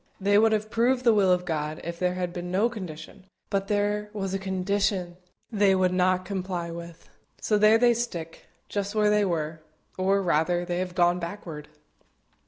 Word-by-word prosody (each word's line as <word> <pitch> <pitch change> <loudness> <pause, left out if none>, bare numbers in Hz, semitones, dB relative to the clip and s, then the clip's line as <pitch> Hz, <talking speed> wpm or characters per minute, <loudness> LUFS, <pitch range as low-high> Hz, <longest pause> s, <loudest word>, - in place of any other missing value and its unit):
They 205 +1 +4
would 225 0 +4
have 215 0 -1
proved 245 +2 +2
the 235 -2 +5
will 195 -3 +4
of 180 0 +1
God 155 -2 -3
if 170 0 -6
there 180 0 0
had 180 -1 -3
been 175 -1 -5
no 200 +6 +2
condition; 185 -3 -9 0.3
but 195 -1 0
there 210 0 0
was 195 -2 -3
a 195 - -1
condition 190 -1 -1 0.3
they 200 -3 +3
would 185 -1 +2
not 185 0 +2
comply 185 -3 -4
with; 170 0 -10 0.3
so 210 -1 +1
there 215 +1 +6
they 240 +1 +4
stick, 180 -9 -5 0.2
just 205 +1 -3
where 210 -1 +3
they 210 -1 +3
were 160 -3 -2 0.4
or, 195 +1 +2
rather, 175 +1 +1
they 175 0 -2
have 180 -1 -4
gone 175 0 +3
backward. 170 -4 -7
185 Hz, 185 wpm, -26 LUFS, 175-205 Hz, 0.4 s, there